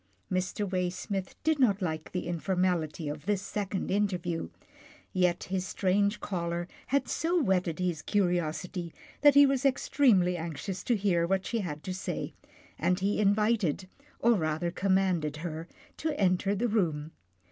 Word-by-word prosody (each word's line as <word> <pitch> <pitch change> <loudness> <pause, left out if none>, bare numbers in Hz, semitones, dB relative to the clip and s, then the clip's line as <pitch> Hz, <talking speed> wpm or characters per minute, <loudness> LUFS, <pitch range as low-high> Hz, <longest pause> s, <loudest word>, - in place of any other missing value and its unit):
Mr. 190 +3 -1
Waysmith 185 +1 -2
did 315 -2 +2
not 210 -7 +4
like 160 -5 -3
the 180 - -3
informality 175 -2 -1
of 150 +3 -6
this 205 -2 +1
second 200 -1 -3
interview, 180 - -1 0.6
yet 180 -1 +2
his 185 -1 -2
strange 200 +3 +1
caller 170 -2 -3 0.2
had 280 +1 +1
so 345 +3 +1
whetted 185 - +1
his 180 -4 -1
curiosity 175 -2 -1 0.3
that 290 -1 +7
he 285 0 +9
was 270 -1 +1
extremely 235 -9 +3
anx 165 0 -5
ious 190 -1 -3
to 240 - +2
hear 185 -5 +2
what 190 +1 0
she 230 - -1
had 155 -7 -4
to 185 - -3
say, 185 - -4 0.5
and 180 0 +2
he 200 +2 +1
invited, 205 -4 +2 0.3
or 235 +1 +4
rather 160 -2 0
commanded, 185 -5 +1
her 165 0 -5 0.3
to 310 -2 -2
enter 195 +1 +2
the 235 +5 0
room. 165 -8 0
185 Hz, 150 wpm, -29 LUFS, 170-205 Hz, 0.6 s, he